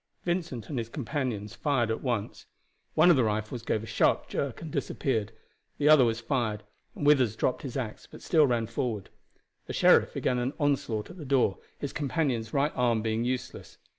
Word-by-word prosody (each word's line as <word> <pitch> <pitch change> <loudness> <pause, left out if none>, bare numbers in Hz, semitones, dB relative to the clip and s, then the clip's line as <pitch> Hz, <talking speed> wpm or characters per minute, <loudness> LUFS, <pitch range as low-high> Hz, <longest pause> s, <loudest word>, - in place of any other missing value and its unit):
Vincent 170 - -2
and 135 - -3
his 115 -1 -4
companions 120 -5 -3
fired 130 -7 0
at 110 - -2
once. 120 -6 -3 0.5
One 175 - +7
of - - +6
the 130 - +3
rifles 110 +2 -2
gave 110 -1 -1
a - - -6
sharp - - +1
jerk 140 -4 -3
and 160 -2 -7
disappeared, 115 -8 -1 0.5
the 150 0 +3
other 155 -4 +8
was 115 -1 +1
fired, 115 -4 -1 0.3
and 145 - -4
Withers 130 -7 +4
dropped 125 - 0
his 135 -2 -5
axe, 115 -5 -5
but - - -13
still 155 -4 +4
ran 120 -3 +1
forward. 115 -3 -3 0.6
The - - -5
sheriff - - +4
began 125 -1 0
an 125 +3 -1
onslaught 135 -6 0
at 185 - -12
the - - -6
door, 130 -8 +2 0.2
his 145 - -5
companion's 135 -7 -1
right 145 +2 +1
arm 120 -3 +1
being 110 +1 0
useless. 125 0 -4
125 Hz, 190 wpm, -28 LUFS, 110-140 Hz, 0.6 s, other